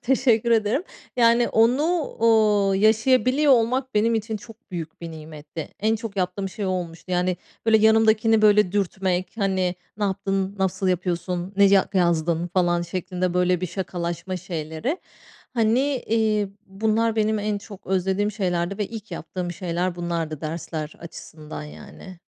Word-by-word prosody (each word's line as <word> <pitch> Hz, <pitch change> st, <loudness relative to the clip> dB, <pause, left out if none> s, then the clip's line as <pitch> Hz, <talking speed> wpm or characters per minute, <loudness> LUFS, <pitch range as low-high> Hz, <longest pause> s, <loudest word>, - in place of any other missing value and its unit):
Teşekkür 235 Hz, -3 st, +2 dB
ederim. 225 Hz, +5 st, +2 dB, 0.3 s
Yani 235 Hz, 0 st, +4 dB
onu, 235 Hz, +5 st, +3 dB, 0.4 s
ooo, 215 Hz, -3 st, +4 dB
yaşayabiliyor 255 Hz, +7 st, +4 dB
olmak, 255 Hz, +2 st, +1 dB
benim 225 Hz, +2 st, +3 dB
için 220 Hz, 0 st, -2 dB
çok 225 Hz, 0 st, -15 dB
büyük 165 Hz, -3 st, -6 dB
bir 170 Hz, -1 st, -6 dB
nimetti. 155 Hz, -1 st, -8 dB
En 220 Hz, +2 st, +2 dB
çok 220 Hz, -2 st, -7 dB
yaptığım 190 Hz, +1 st, -1 dB
şey, 200 Hz, +1 st, -5 dB
o -, -, 0 dB
olmuştu. 180 Hz, -1 st, -4 dB
Yani, 180 Hz, 0 st, +1 dB, 0.3 s
böyle 220 Hz, -1 st, +6 dB
yanımdakini 220 Hz, 0 st, +4 dB
böyle 210 Hz, -3 st, +5 dB
dürtmek, 185 Hz, -2 st, -1 dB
hani, 190 Hz, -3 st, +1 dB, 0.2 s
ne 210 Hz, -, -1 dB
yaptın, 195 Hz, 0 st, -1 dB
nasıl 190 Hz, 0 st, 0 dB
yapıyorsun, 180 Hz, 0 st, -2 dB
ne 200 Hz, 0 st, +6 dB
ca 195 Hz, -1 st, +4 dB
yazdın, 170 Hz, -2 st, +1 dB
falan 175 Hz, -1 st, +1 dB
şeklinde 180 Hz, +1 st, -3 dB
böyle 180 Hz, -1 st, +2 dB
bir 185 Hz, -, -1 dB
şakalaşma 175 Hz, 0 st, -4 dB
şeyleri. 170 Hz, -, -4 dB, 0.6 s
Hani, 250 Hz, +4 st, +2 dB
iii, 215 Hz, -2 st, +2 dB, 0.2 s
bunlar 220 Hz, +3 st, 0 dB
benim 215 Hz, 0 st, +2 dB
en 205 Hz, 0 st, -1 dB
çok 200 Hz, -1 st, -12 dB
özlediğim 190 Hz, +2 st, 0 dB
şeylerdi 185 Hz, -2 st, -1 dB
ve 210 Hz, -, -1 dB
ilk 225 Hz, -1 st, -9 dB
yaptığım 175 Hz, +1 st, -5 dB
şeyler 175 Hz, 0 st, -2 dB
bunlardı, 170 Hz, -3 st, -3 dB
dersler 155 Hz, -1 st, -5 dB
açısından, 155 Hz, -2 st, -9 dB
yani. 185 Hz, +3 st, -11 dB
195 Hz, 145 wpm, -24 LUFS, 175-220 Hz, 0.6 s, böyle